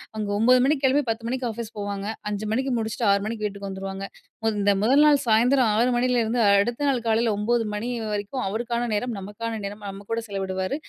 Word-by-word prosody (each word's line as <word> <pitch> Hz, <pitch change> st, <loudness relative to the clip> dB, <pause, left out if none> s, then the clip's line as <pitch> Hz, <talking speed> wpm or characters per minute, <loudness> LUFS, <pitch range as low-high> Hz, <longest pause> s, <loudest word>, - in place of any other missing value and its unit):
அங்க 210 Hz, -1 st, -3 dB
9 250 Hz, +4 st, +5 dB
மணிக்கு 280 Hz, +1 st, +1 dB
கிளம்பி 275 Hz, +3 st, +3 dB
10 225 Hz, +1 st, -2 dB
மணிக்கு 255 Hz, +1 st, -2 dB
ஆஃபீஸ் 225 Hz, 0 st, -5 dB
போவாங்க. 200 Hz, 0 st, -4 dB, 0.2 s
5 210 Hz, +1 st, -3 dB
மணிக்கு 260 Hz, +4 st, 0 dB
முடிச்சுட்டு 225 Hz, +1 st, -2 dB
6 200 Hz, 0 st, +2 dB
மணிக்கு 220 Hz, 0 st, -4 dB
வீட்டுக்கு 200 Hz, -1 st, -5 dB
வந்துருவாங்க. 195 Hz, 0 st, -5 dB, 0.5 s
இந்த 205 Hz, 0 st, +3 dB
முதல் 260 Hz, +7 st, +4 dB
நாள் 295 Hz, -1 st, +6 dB
சாயந்தரம் 240 Hz, +3 st, +4 dB
6 240 Hz, +3 st, +3 dB
மணிலேருந்து 240 Hz, -1 st, +1 dB
அடுத்த 215 Hz, +6 st, +2 dB
நாள் 265 Hz, -3 st, +2 dB
காலையில 225 Hz, 0 st, +2 dB
9 230 Hz, +3 st, +1 dB
மணி 210 Hz, +4 st, -3 dB, 0.2 s
வரைக்கும் 210 Hz, +5 st, -3 dB
அவருக்கான 235 Hz, +3 st, -2 dB
நேரம், 235 Hz, +4 st, -1 dB
நமக்கான 220 Hz, +3 st, -5 dB
நேரம், 205 Hz, +1 st, -6 dB
நம்ம 195 Hz, +1 st, -9 dB
கூட 230 Hz, 0 st, -1 dB
செலவிடுவார். 190 Hz, +1 st, -2 dB
225 Hz, 185 wpm, -24 LUFS, 205-240 Hz, 0.5 s, நாள்